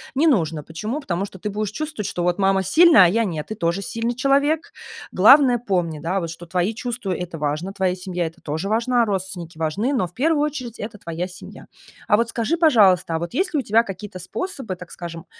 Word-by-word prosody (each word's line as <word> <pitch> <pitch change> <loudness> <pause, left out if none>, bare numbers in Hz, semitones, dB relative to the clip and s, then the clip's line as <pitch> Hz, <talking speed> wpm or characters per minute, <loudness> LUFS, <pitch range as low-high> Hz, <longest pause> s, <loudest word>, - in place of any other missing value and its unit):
не 300 +5 +3
нужно. 165 - +1
Почему? 210 - -4
Потому 190 -7 -2
что 190 -2 -12
ты 210 - -3
будешь 210 0 -3
чувствовать, 305 -5 -4
что 175 - -3
вот 175 +1 +1
мама 195 0 +3
сильная, 310 - +7
а - - +6
я 225 +7 +2
нет, 160 -6 -4
ты 215 - -5
тоже 170 +1 -1
сильный 230 +4 -2
человек. 280 +5 +1 0.4
Главное, 270 -3 +6
помни, 180 -9 -1
да, 175 +2 -2
что 165 +1 -9
твои 180 +5 -1
чувства- 235 -5 -3
это 175 -2 -6
важно, 150 +6 -2
твоя 190 -2 0
семья- 180 -2 -3
это 165 - -12
тоже 160 +6 -3
важна, 235 +2 +2
родственники 185 -4 -4
важны, 165 - -1
но 225 -8 +1
в 175 - -20
первую 295 - +1
очередь 255 -6 -4
это 210 -1 -7
твоя 170 -2 -4
семья. 185 - -12 0.4
А 210 - +4
вот 230 0 0
скажи, 240 +9 -1
пожалуйста, 195 - +4
а - - -1
вот 170 +5 -5
есть 365 +6 0
ли - - +3
у - - -2
тебя 220 +1 +4
какие-то 195 -2 -8
способы, 265 - -5
так 180 -1 -12
скажем, 170 -2 -8
195 Hz, 215 wpm, -22 LUFS, 175-240 Hz, 0.4 s, сильная